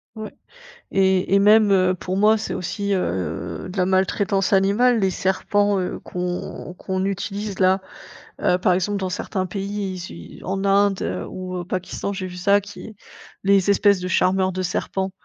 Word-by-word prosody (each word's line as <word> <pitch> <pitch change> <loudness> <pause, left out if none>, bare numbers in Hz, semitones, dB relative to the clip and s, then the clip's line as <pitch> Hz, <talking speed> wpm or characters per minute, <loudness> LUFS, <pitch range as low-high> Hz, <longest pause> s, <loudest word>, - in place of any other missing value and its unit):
Ouais. 215 -1 -7 0.6
Et 190 0 +2
et - - +5
même 210 0 +5
heu, 185 -1 +3
pour 185 +1 -4
moi, 215 +2 +4
c'est - - -4
aussi, 200 +2 -2
heu, 85 - -3
de 185 - -8
la 180 - +3
maltraitance 195 +1 +1
animale, 215 +5 +3
les 190 - +3
serpents, 200 +2 +1
heu, 180 - -3
qu'on 180 0 -5
qu'on 190 0 -3
utilise 200 +1 -3
là. 190 +1 +3 0.6
Heu, 180 - +3
par 185 0 +2
exemple, 195 +3 0
dans 190 -1 -2
certains 185 +1 -3
pays, 200 0 -4
issus, 185 0 -9
en 195 +1 -2
Inde, 200 0 +3
heu, - - -3
ou 185 0 -6
au - - -4
Pakistan, 185 +2 -4
j'ai 185 -1 -4
vu 180 - -9
ça, 200 +3 +3
qui 205 +1 -11 0.5
les 200 0 +4
espèces 200 -1 +4
de 185 - -3
charmeurs 185 0 +2
de 185 +1 -3
serpents. 190 +1 -2
190 Hz, 175 wpm, -22 LUFS, 185-200 Hz, 0.6 s, et